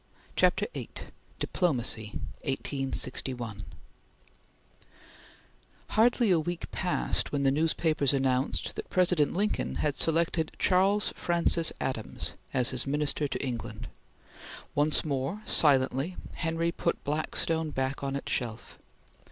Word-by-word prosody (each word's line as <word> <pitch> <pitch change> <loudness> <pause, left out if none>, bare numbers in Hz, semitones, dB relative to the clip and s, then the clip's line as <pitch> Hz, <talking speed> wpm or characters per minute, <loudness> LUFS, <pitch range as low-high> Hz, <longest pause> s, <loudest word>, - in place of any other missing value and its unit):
CHAPTER - - +3
VIII - - -6 0.5
DIPLOMACY 120 - -1 0.3
(1861) 130 -5 -2 2.3
HARDLY 235 -1 +3
a 170 - +4
week 175 +2 -4
passed 180 -2 0
when 140 -1 0
the 135 - +4
newspapers 155 -1 +2
announced 135 -1 0
that - - -6
President 180 -5 +2
Lincoln 210 +3 0
had 150 -2 0
selected 165 0 +1
Charles 195 +3 +3
Francis 170 -1 +2
Adams 115 -5 -2 0.2
as 125 -2 +1
his 130 0 -1
Minister 145 +1 +1
to 140 - -3
England. 115 -2 -5 0.8
Once 150 +2 +1
more, 145 +8 -2
silently, 135 +3 +4 0.2
Henry 165 0 -1
put - - -2
Blackstone 155 +2 0
back 135 -1 -2
on 140 0 -2
its 140 - -4
shelf. 115 -3 -4
145 Hz, 110 wpm, -29 LUFS, 130-170 Hz, 2.3 s, a